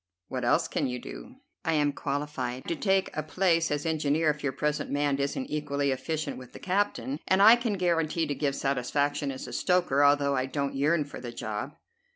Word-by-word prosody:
What 130 Hz, -1 st, -3 dB
else 120 Hz, -, +3 dB
can -, -, -1 dB
you 125 Hz, 0 st, -3 dB
do?" -, -, -9 dB, 0.3 s
"I 160 Hz, -, +1 dB
am 145 Hz, -2 st, +2 dB
qualified 140 Hz, -3 st, -3 dB
to 170 Hz, -, -1 dB
take 190 Hz, +2 st, +1 dB
a 155 Hz, -, 0 dB
place 165 Hz, +1 st, +1 dB
as 145 Hz, +1 st, -2 dB
engineer 155 Hz, 0 st, +2 dB
if 150 Hz, 0 st, -8 dB
your 140 Hz, -, 0 dB
present 150 Hz, +2 st, -1 dB
man 145 Hz, -1 st, 0 dB
isn't 140 Hz, -, -1 dB
equally 145 Hz, -, -1 dB
efficient 155 Hz, +4 st, -3 dB
with 125 Hz, -1 st, -13 dB
the -, -, -9 dB
captain; 205 Hz, +8 st, -1 dB
and 190 Hz, -, +3 dB
I 220 Hz, +4 st, +9 dB
can 235 Hz, -3 st, -1 dB
guarantee 170 Hz, -3 st, +1 dB
to 145 Hz, -, -2 dB
give 140 Hz, -1 st, -1 dB
satisfaction 140 Hz, +2 st, 0 dB
as 130 Hz, -, -7 dB
a -, -, -8 dB
stoker, 175 Hz, -6 st, +2 dB
although 140 Hz, -1 st, +4 dB
I 130 Hz, 0 st, 0 dB
don't 140 Hz, +1 st, -2 dB
yearn 150 Hz, +3 st, +2 dB
for 140 Hz, -, -9 dB
the 120 Hz, -1 st, -6 dB
job." 115 Hz, +3 st, -5 dB
145 Hz, 200 wpm, -28 LUFS, 135-165 Hz, 0.3 s, I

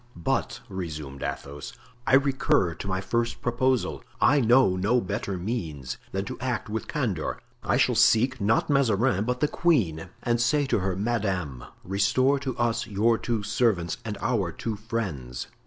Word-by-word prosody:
"But," 85 Hz, -, -1 dB
resumed 75 Hz, -7 st, -6 dB
Athos, 70 Hz, +1 st, -5 dB, 0.3 s
"I 135 Hz, -, +6 dB
recur 135 Hz, -, +2 dB
to 95 Hz, -, -8 dB
my 95 Hz, 0 st, -1 dB
first 115 Hz, +3 st, -1 dB
proposal. 125 Hz, +1 st, 0 dB, 0.2 s
I 145 Hz, +4 st, +5 dB
know 120 Hz, -4 st, +5 dB
no 105 Hz, +7 st, +2 dB
better 100 Hz, -2 st, -3 dB
means 80 Hz, -, -4 dB
than 95 Hz, +1 st, -2 dB
to -, -, -6 dB
act 115 Hz, -3 st, -2 dB
with 110 Hz, -, -3 dB
candor. 110 Hz, -, -2 dB, 0.2 s
I -, -, +1 dB
shall -, -, +3 dB
seek, 125 Hz, +2 st, +4 dB
not 110 Hz, +3 st, +2 dB
Mazarin, 120 Hz, -6 st, +2 dB
but 125 Hz, +1 st, -2 dB
the 150 Hz, -, +4 dB
queen, 95 Hz, -, +1 dB
and 120 Hz, 0 st, +1 dB
say 145 Hz, +5 st, +2 dB
to 135 Hz, -, +1 dB
her, 95 Hz, -1 st, -1 dB
'Madame, 95 Hz, -, -2 dB, 0.2 s
restore 130 Hz, +9 st, +2 dB
to 130 Hz, -2 st, -4 dB
us 120 Hz, 0 st, 0 dB
your 110 Hz, +2 st, +2 dB
two 115 Hz, -3 st, -1 dB
servants 100 Hz, -6 st, +1 dB
and 105 Hz, -2 st, -4 dB
our 100 Hz, -9 st, 0 dB
two 115 Hz, +4 st, -4 dB
friends. 95 Hz, -, -4 dB
110 Hz, 160 wpm, -26 LUFS, 90-120 Hz, 0.3 s, I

